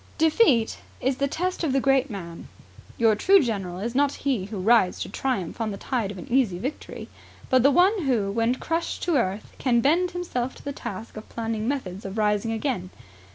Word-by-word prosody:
Defeat 315 - +3 0.2
is 260 0 0
the 280 - +1
test 360 +5 -2
of 290 -5 +1
the 270 - +3
great 270 0 +2
man. 170 -6 -8 0.5
Your 225 -2 +4
true 385 - +5
general 195 - -2
is 230 +4 -3
not 280 +1 +2
he 250 -9 +1
who 205 +1 -6
rides 200 -2 +3
to - - -4
triumph 230 -7 -2
on 220 - 0
the 200 - -5
tide 230 -2 -2
of 200 - -7
an 175 - -8
easy 240 -9 +2
victory, 265 +11 -6 0.4
but 255 -1 +5
the 275 - +6
one 360 +5 +3
who, 220 -7 +1
when 230 +3 +1
crushed 330 +5 -3
to 345 -3 +1
earth, 205 -5 -1
can 245 -3 +2
bend 335 +9 +3
himself 335 -9 -3
to - - -14
the 285 - -4
task 215 -2 -7
of 215 - -9
planning 225 -1 -3
methods 205 -9 -3
of 195 +2 -6
rising 210 +1 +1
again. 225 -6 -2
240 Hz, 200 wpm, -25 LUFS, 210-280 Hz, 0.5 s, the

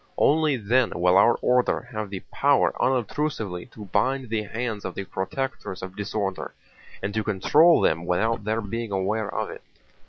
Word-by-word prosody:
Only 150 -2 +3
then 120 +3 +1
will 90 +1 +4
our 110 +4 +6
order 125 0 +2
have 110 -3 -4
the 95 -2 -6
power 140 0 +3
unobtrusively 125 -7 -1
to 110 -4 -11
bind 130 +5 0
the 110 -1 0
hands 110 0 -4
of 95 - -5
the 100 - -3
protectors 95 +1 -4
of 95 0 -7
disorder 100 -2 -3 0.5
and 100 +1 -2
to 110 0 -1
control 145 - +4
them 80 +2 +1
without 110 +5 0
their 110 +2 -1
being 115 +1 -4
aware 100 +2 -1
of - - -3
it. - - -10
110 Hz, 165 wpm, -25 LUFS, 95-125 Hz, 0.5 s, our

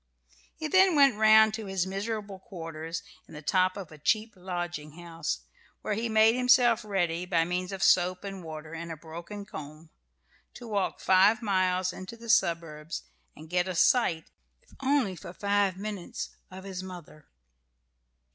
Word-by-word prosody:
He 315 - -4
then 375 +2 +5
went 275 -5 +6
round 220 0 +6
to 220 -2 -5
his 190 -2 -1
miserable 200 0 -4
quarters, 165 -3 -7 0.2
in - - -13
the 150 - -9
top 185 +4 +2
of 190 -6 -8
a 155 - -13
cheap 215 +7 +1
lodging 175 -4 -5
house, 165 - -4 0.4
where 210 - -1
he 225 +3 -2
made 220 +1 +5
himself 245 -2 +4
ready, 175 -5 -1
by 165 -3 +2
means 180 +2 -2
of 195 0 -3
soap 180 -1 +3
and 195 -2 -7
water 155 0 -8
and 165 +1 -6
a 160 - -6
broken 170 +6 -8
comb, 155 -2 -10 0.6
to 240 - -9
walk 205 -3 -1
five 200 +4 +4
miles 185 -2 +1
into 190 +6 -9
the 230 0 -11
suburbs 165 - 0 0.3
and 155 - -12
get 180 0 +1
a 185 - -3
sight, 165 -4 +2 0.3
if - - -25
only 265 -8 +1
for 170 +1 -10
five 200 -1 +1
minutes, 200 -3 -5 0.2
of 185 0 -10
his 190 -2 -6
mother. 180 -5 -11
185 Hz, 165 wpm, -28 LUFS, 170-215 Hz, 0.6 s, went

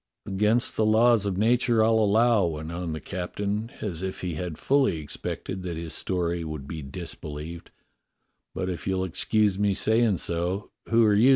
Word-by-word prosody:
"Against 105 +5 +1
the 110 - +2
laws 110 0 +4
of 95 -2 -2
nature, 115 +1 +3
I'll 110 0 +4
allow," 110 +1 +4
went 80 0 -5
on 85 -1 -4
the 80 - -4
captain, 100 +7 -3
as 90 -5 -3
if 95 0 -4
he 90 -2 -3
had 80 0 -4
fully 135 - +2
expected 85 +5 -5
that 90 -3 -4
his 80 -1 -5
story 85 -2 -1
would 75 -4 -6
be 80 +1 -5
disbelieved, 75 +4 -7 0.9
"but 95 - -2
if 90 -5 -4
you'll 95 -1 0
excuse 100 +2 +1
me 100 -1 +2
saying 110 -2 +3
so, 90 +5 -2 0.2
who 115 0 +5
are 105 - +4
you. 110 +6 +5
95 Hz, 175 wpm, -26 LUFS, 85-110 Hz, 0.9 s, who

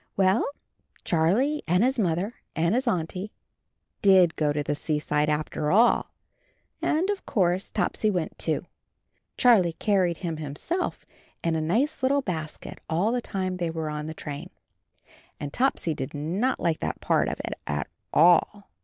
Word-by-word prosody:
Well, 190 +3 +4 0.6
Charlie 205 - +2
and 180 +5 +3
his 260 0 +1
Mother 185 +3 0 0.2
and 170 +4 +2
his 255 +2 0
Auntie 185 0 -2 0.7
did 185 -4 +5
go 150 -2 +1
to 145 0 -1
the 145 - -1
seaside 150 0 0
after 150 0 -1
all, 230 +7 +4 0.7
and 320 +5 +1
of 405 - -4
course 185 -2 +1
Topsy 215 - 0
went, 180 -5 -2
too. - - -1 0.7
Charlie 205 -9 +5
carried 185 -3 +1
him 165 -2 -2
himself 155 - -3 0.4
in 165 -1 +1
a 160 - 0
nice 245 - 0
little 275 +1 +2
basket, 160 -6 -5
all 175 +7 +1
the 245 0 0
time 185 -4 -3
they 175 -2 -1
were 160 -1 -3
on 150 0 -4
the 160 - -6
train, 145 -2 -7 0.9
and 145 -1 -5
Topsy 250 -10 +1
did 135 0 -5
not 180 - -1
like 165 -2 0
that - - -3
part - - +2
of - - -3
it - - -3
at 75 0 -1 0.3
all. 175 +5 +4
175 Hz, 155 wpm, -26 LUFS, 155-220 Hz, 0.9 s, did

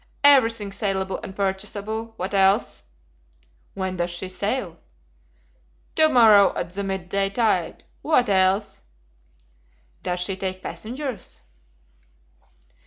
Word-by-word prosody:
"Everything 230 -7 +4
salable 195 -1 -2
and 190 - -9
purchasable. 210 +3 -3
What 185 +3 -4
else?" 195 +2 +2 0.9
"When 190 -1 -3
does 175 0 -1
she 175 +2 -6
sail?" 185 -2 -3 1.1
"To 315 0 +4
morrow 220 -7 +6
at 170 - -4
the 200 +2 -4
mid 190 -2 -4
day 195 +1 0
tide. 200 -6 0 0.2
What 300 -6 +2
else?" 195 +1 +1 1.2
"Does 180 0 -2
she 190 +2 -1
take 185 -1 -5
passengers?" 245 - -7
195 Hz, 105 wpm, -23 LUFS, 190-220 Hz, 1.2 s, morrow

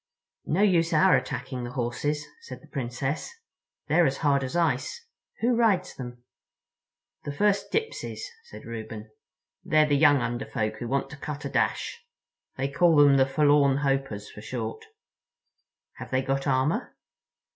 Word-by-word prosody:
"No 185 +6 +2
use 170 -5 +3
our 150 -3 +5
attacking 125 -1 -3
the 120 +1 -6
horses," 140 +4 -2 0.2
said 465 - -9
the - - -19
Princess. 130 +2 -3 0.6
"They're 175 -1 +4
as 135 +1 -1
hard 140 -1 +3
as 130 +5 -4
ice. 165 - 0 0.4
Who 240 +1 +3
rides 205 -6 +2
them?" 120 -1 -9 1.0
"The 145 - -4
First 205 +7 +1
Dipsys," 450 +1 -3 0.2
said 470 - -12
Reuben. 110 -1 -7 0.5
"They're 155 0 +4
the 145 -1 +2
young 145 0 +6
Under 120 +1 -2
Folk 110 0 -2
who 120 - -5
want 135 +2 -1
to 145 - -9
cut 150 0 -6
a - - -2
dash. 470 - -1 0.5
They 135 +1 0
call 165 +4 +3
them 145 -2 +6
the 135 0 +4
Forlorn 145 -1 +4
Hopers, 135 -7 -1
for 105 - -11
short." 115 -1 -5 1.1
"Have - - -8
they 130 0 0
got 135 +1 -1
armor?" 140 - 0
140 Hz, 155 wpm, -27 LUFS, 125-155 Hz, 1.1 s, young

